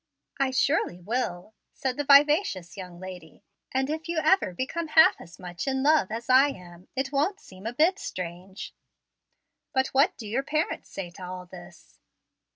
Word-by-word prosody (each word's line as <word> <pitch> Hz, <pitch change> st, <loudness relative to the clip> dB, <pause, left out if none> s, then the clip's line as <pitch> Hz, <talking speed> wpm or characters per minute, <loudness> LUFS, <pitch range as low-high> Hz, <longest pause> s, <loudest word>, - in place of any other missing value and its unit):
"I 275 Hz, -1 st, +2 dB
surely 260 Hz, -, +1 dB
will," 210 Hz, -1 st, -3 dB, 0.2 s
said 265 Hz, -3 st, -2 dB
the 290 Hz, -, -2 dB
vivacious 285 Hz, -, +4 dB
young 180 Hz, -3 st, -9 dB
lady; 180 Hz, -4 st, -10 dB, 0.3 s
"and 265 Hz, 0 st, 0 dB
if 315 Hz, +2 st, -4 dB
you 340 Hz, -, -1 dB
ever 315 Hz, -, +3 dB
become 280 Hz, -, -3 dB
half 320 Hz, +1 st, +5 dB
as 170 Hz, -, -13 dB
much 180 Hz, +4 st, -6 dB
in 265 Hz, 0 st, 0 dB
love 300 Hz, -9 st, +4 dB
as 230 Hz, +2 st, -5 dB
I 260 Hz, +2 st, +6 dB
am, 180 Hz, -8 st, -10 dB
it 270 Hz, +1 st, -2 dB
won't 310 Hz, +9 st, 0 dB
seem 190 Hz, -, -10 dB
a 235 Hz, -, -3 dB
bit 335 Hz, +9 st, +3 dB
strange." 185 Hz, +2 st, -7 dB, 1.0 s
"But 265 Hz, 0 st, +2 dB
what 290 Hz, +8 st, +3 dB
do 225 Hz, -, -8 dB
your 235 Hz, +6 st, 0 dB
parents 305 Hz, +3 st, -2 dB
say 180 Hz, -3 st, -6 dB
to 185 Hz, +2 st, -11 dB
all 180 Hz, 0 st, -7 dB
this?" 175 Hz, -, -14 dB
255 Hz, 170 wpm, -27 LUFS, 180-290 Hz, 1.0 s, I